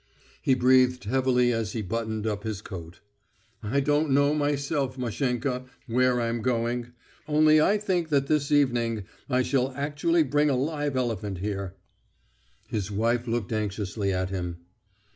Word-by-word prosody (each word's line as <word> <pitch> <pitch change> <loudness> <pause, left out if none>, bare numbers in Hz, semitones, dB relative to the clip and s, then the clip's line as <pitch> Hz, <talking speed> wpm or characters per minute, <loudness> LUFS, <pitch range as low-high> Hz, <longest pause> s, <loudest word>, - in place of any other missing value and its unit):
He 130 - +3
breathed 125 -1 +4
heavily 125 +1 +2
as 115 -3 -2
he 110 - -3
buttoned 110 +1 -3
up 105 -2 -2
his 110 -2 -4
coat. 85 -3 -9 0.6
"I 115 +6 0
don't 150 +2 +1
know 140 +2 +3
myself, 145 -2 -1
Mashenka, 125 +1 -2 0.2
where 125 +1 +2
I'm 115 0 -1
going.... 120 0 -1 0.3
Only 155 0 +5
I 200 +7 +4
think 185 -5 -1
that 140 -2 +2
this 150 0 0
evening 120 -7 +2 0.3
I 130 -1 +2
shall 130 0 +1
actually 150 +4 +1
bring 145 +2 +2
a 135 - +2
live 145 +1 -1
elephant 105 -6 -2
here. 100 -1 -4 0.9
His 105 -2 -3
wife 115 +4 0
looked 115 -2 -2
anxiously 105 -1 -2
at 95 0 -1
him. 90 -2 -4
125 Hz, 145 wpm, -26 LUFS, 110-140 Hz, 0.9 s, Only